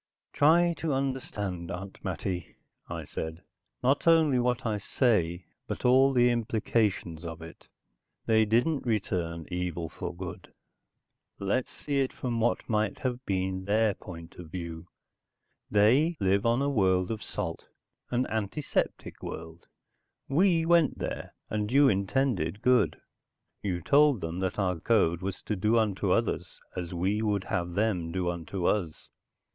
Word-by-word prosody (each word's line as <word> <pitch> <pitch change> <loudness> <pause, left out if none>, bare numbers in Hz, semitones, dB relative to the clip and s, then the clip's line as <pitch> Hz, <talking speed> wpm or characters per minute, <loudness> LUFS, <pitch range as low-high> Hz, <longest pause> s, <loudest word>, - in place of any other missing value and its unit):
"Try 170 +4 +5
to 160 -3 -1
understand, 105 -10 -3
Aunt 95 +1 -7
Mattie," 90 0 -4 0.3
I - - -4
said. 80 +2 -6 0.4
"Not 135 +6 +2
only 160 -6 +5
what 125 +1 0
I 105 -2 0
say, 95 -7 +1 0.2
but - - -5
all 130 +2 +6
the 125 -2 +4
implications 110 -7 0
of 85 -1 -6
it. 80 - -12 0.6
They 110 -1 +4
didn't 120 +8 +2
return 90 -8 -1
evil 90 -2 -2
for - - -5
good. 90 0 -8 0.9
Let's 100 +6 -1
see 145 -2 -2
it 135 -1 +1
from 120 -3 -2
what 115 +1 0
might 110 -2 0
have 125 -1 -3
been 95 -1 -1
their 105 +1 +3
point 85 -3 -11
of 90 -3 -9
view. 85 -1 -6 0.8
They 130 +11 +4
live 100 +3 +2
on 120 +4 +2
a - - +1
world 95 -5 +2
of 110 - -4
salt, 85 -6 -5 0.4
an 125 +1 +1
antiseptic 110 +7 -2
world. 80 +1 -8 0.6
We 165 +2 +3
went 170 -3 +4
there, - - -5
and 105 0 -2
you 140 +2 +6
intended 100 -2 0
good. 125 -3 +3 0.6
You 90 -4 -2
told 145 - +4
them 80 +2 -4
that 95 -1 -2
our 90 -4 0
code 85 -4 +2
was 95 0 -4
to 105 - -2
do 105 +4 +2
unto 105 -4 +1
others - - 0 0.2
as 90 -2 -4
we 95 +5 0
would 105 -3 0
have 90 -1 -2
them 95 -6 0
do 90 0 0
unto 85 +2 -4
us. 85 -7 -1
105 Hz, 145 wpm, -29 LUFS, 90-125 Hz, 0.9 s, all